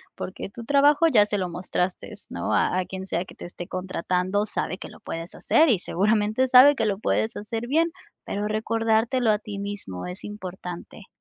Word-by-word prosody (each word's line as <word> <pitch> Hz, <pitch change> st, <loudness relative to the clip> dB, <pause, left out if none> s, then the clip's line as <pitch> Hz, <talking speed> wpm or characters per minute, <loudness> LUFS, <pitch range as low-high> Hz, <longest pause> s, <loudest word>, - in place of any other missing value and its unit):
porque 185 Hz, -, -6 dB
tu 230 Hz, +4 st, -9 dB
trabajo 285 Hz, +5 st, +4 dB
ya 225 Hz, -10 st, +5 dB
se 205 Hz, 0 st, -2 dB
lo 185 Hz, -2 st, -2 dB
mostraste, 180 Hz, +1 st, -3 dB, 0.2 s
¿no?, -, -, -3 dB
a -, -, +2 dB
a 185 Hz, -, -1 dB
quien 190 Hz, +1 st, -6 dB
sea 180 Hz, -1 st, -2 dB
que -, -, -14 dB
te -, -, -11 dB
esté 175 Hz, 0 st, -8 dB
contratando 185 Hz, +2 st, -1 dB
sabe 185 Hz, -3 st, -2 dB
que -, -, -8 dB
lo -, -, -15 dB
puedes 165 Hz, +1 st, -6 dB
hacer 320 Hz, -, +4 dB
y 220 Hz, -7 st, +3 dB
seguramente 215 Hz, +7 st, +1 dB
sabe 260 Hz, +3 st, +8 dB
que 225 Hz, -, +1 dB
lo 205 Hz, -2 st, 0 dB
puedes 220 Hz, +1 st, 0 dB
hacer 225 Hz, +3 st, -4 dB
bien, 325 Hz, +5 st, +2 dB, 0.3 s
pero 205 Hz, +1 st, -3 dB
recordártelo 225 Hz, +2 st, +1 dB
a 210 Hz, -, +1 dB
ti 205 Hz, -1 st, -7 dB
mismo 200 Hz, -, -6 dB
es 180 Hz, +2 st, -8 dB
importante. 190 Hz, -1 st, -8 dB
205 Hz, 195 wpm, -25 LUFS, 185-230 Hz, 0.3 s, sabe